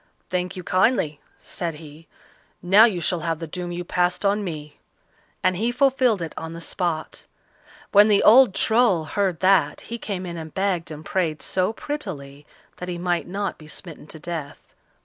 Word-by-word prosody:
"Thank 180 0 -2
you 185 - -6
kindly," 185 - +1 0.2
said 170 -3 -5
he. 155 +1 -13 0.6
"Now 195 +5 +7
you 205 -7 0
shall 175 +1 0
have 165 0 -2
the 165 - -6
doom 175 +2 -5
you 175 0 -4
passed 180 +2 0
on 205 +1 +2
me," 150 -5 -7 0.6
and 185 0 +3
he 225 +6 0
fulfilled 255 -6 +2
it 160 - -6
on 160 0 -6
the 165 - -7
spot. 170 -1 -3 0.6
When 205 +1 +7
the 205 -2 +4
old 230 -3 +7
Troll 220 -7 +3
heard 185 +2 -1
that, 185 -6 +3
he 235 0 -7
came 190 -4 -4
in 170 -1 -6
and 160 -1 -8
begged 190 -4 0
and 155 0 -9
prayed 165 -5 -1
so 185 +2 0
prettily 155 - -7 0.3
that 180 - -6
he 175 - -3
might 175 0 -1
not 200 +2 -3
be 155 - -13
smitten 155 -1 -10
to 160 - -10
death. 160 -2 -6
180 Hz, 180 wpm, -23 LUFS, 160-200 Hz, 0.6 s, Now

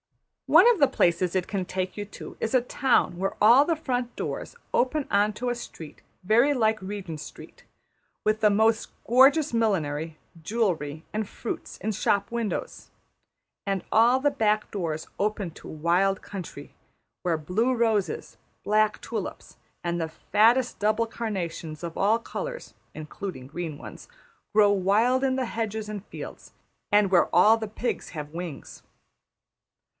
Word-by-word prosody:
One 475 - +7
of 465 -6 +3
the 280 - +6
places 175 -3 +1
it 185 -2 0
can 195 -2 -2
take 185 +1 -3
you 205 - -4
to 205 - -10
is 225 - -1
a 255 - +6
town 245 -6 +1
where 195 +2 -2
all 235 +6 +7
the 330 +2 0
front 250 -6 -2
doors - - -4 0.2
open 275 +3 +1
on 205 +1 +3
to 245 +4 -3
a 245 - -1
street 165 -9 -10 0.2
very 235 +9 +4
like 220 -4 +1
Regent 190 -5 -6
Street; - - -12 0.6
with 215 0 +1
the 210 - +6
most 220 +2 +2
gorgeous 270 +4 +5
millinery, 160 -8 0 0.2
jewellery, 160 -6 -1
and 215 -1 -2
fruits 235 - -6
in 220 - -2
shop 200 +1 0
windows; 235 -3 -4 0.8
and 195 -2 -1
all 235 +4 +5
the 290 +2 +2
back 215 -4 0
doors 165 -6 -3
open 205 -3 -1
to - - -13
wild 175 +5 +1
country 175 -7 -8 0.5
where 170 -2 0
blue 200 +11 0
roses, 225 -5 0 0.3
black 215 0 +2
tulips, - - -6 0.3
and 170 0 -1
the 160 - -2
fattest 230 +9 +2
double 215 +2 +2
carnations 180 -9 -5
of 170 -1 -5
all 215 +4 +2
colours - - -6 0.2
(including 155 -3 -7
green 160 0 -5
ones) - - -11 0.4
grow 210 -1 +5
wild 210 +7 +2
in 260 -1 +2
the 260 - 0
hedges 220 -2 -3
and 210 -2 -6
fields; - - -9 0.4
and 205 -1 +4
where 180 - +5
all 210 +5 +7
the 225 -1 -4
pigs 235 +3 -3
have 150 -3 -7
wings. 170 -4 -7
210 Hz, 150 wpm, -26 LUFS, 180-230 Hz, 0.8 s, One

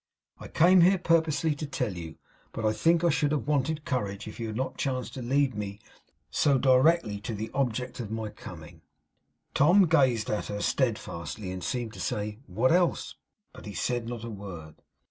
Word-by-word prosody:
I - - -8
came 180 +2 +5
here 185 +3 +5
purposely 165 -2 +2
to 150 +1 -5
tell 125 -8 -2
you, 80 -2 -7 0.4
but 115 - -3
I 110 - +3
think 165 +10 +2
I 170 - +4
should 145 -1 +1
have 150 - -1
wanted 150 +1 0
courage 100 -7 -2
if 110 - -9
you 115 - -3
had 110 - -5
not 130 +2 -2
chanced 130 -2 -2
to 130 - -6
lead 135 +2 +1
me 100 -1 -5 0.5
so 140 -3 +3
directly 130 -3 +3
to 110 +2 -5
the 110 +2 -5
object 125 -1 -2
of 115 -4 -4
my 110 -1 -3
coming.' 85 -4 -11 0.7
Tom 180 +7 +5
gazed 130 -9 +2
at 105 - -2
her 105 0 -4
steadfastly, 105 -5 -2
and 90 -1 -6
seemed 115 +4 -3
to - - -10
say, 105 +1 -3
'What 110 +8 +1
else?' 175 0 +2 0.4
But - - -11
he 100 - -7
said 120 +5 -1
not 120 -2 -6
a 115 - -5
word. 90 -7 -9
120 Hz, 190 wpm, -28 LUFS, 105-145 Hz, 0.7 s, came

